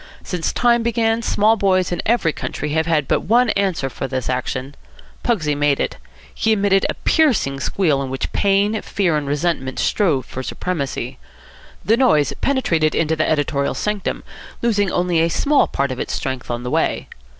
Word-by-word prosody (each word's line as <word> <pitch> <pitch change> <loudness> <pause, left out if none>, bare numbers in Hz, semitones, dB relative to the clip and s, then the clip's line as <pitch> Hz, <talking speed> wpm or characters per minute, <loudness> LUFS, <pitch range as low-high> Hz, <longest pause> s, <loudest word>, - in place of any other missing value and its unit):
Since 175 -4 -2
time 240 -1 +3
began, 230 0 +1
small 220 -1 +3
boys 185 -3 +1
in 175 - -1
every 220 -9 +2
country 150 - -4
have 160 +2 0
had 155 -5 +1
but - - +2
one 235 +2 +3
answer 190 -8 0
for 135 0 -5
this 130 -2 -3
action. 130 +2 -3 0.5
Pugsy 165 -11 +1
made 145 -1 +1
it. - - -2 0.4
He 220 - +1
emitted 200 -2 +2
a - - -2
piercing 235 - +2
squeal 150 -1 +1
in 135 - -4
which 130 0 -4
pain, 205 +2 +2
fear, 180 -6 0
and 150 -2 -2
resentment 145 -3 -1
strove 155 -11 +1
for 130 - -6
supremacy. 145 +1 -4 0.7
The 225 +2 +3
noise 155 - +3
penetrated 170 - +1
into 160 0 +1
the 155 - 0
editorial 145 -2 0
sanctum, 210 -1 -2 0.4
losing 205 -5 +1
only 175 -2 +1
a 165 +1 +2
small 285 - +2
part 140 0 -1
of 130 - -5
its - - -3
strength 130 -2 -4
on 120 0 -3
the 125 - -4
way. - - 0
170 Hz, 175 wpm, -20 LUFS, 140-210 Hz, 0.7 s, time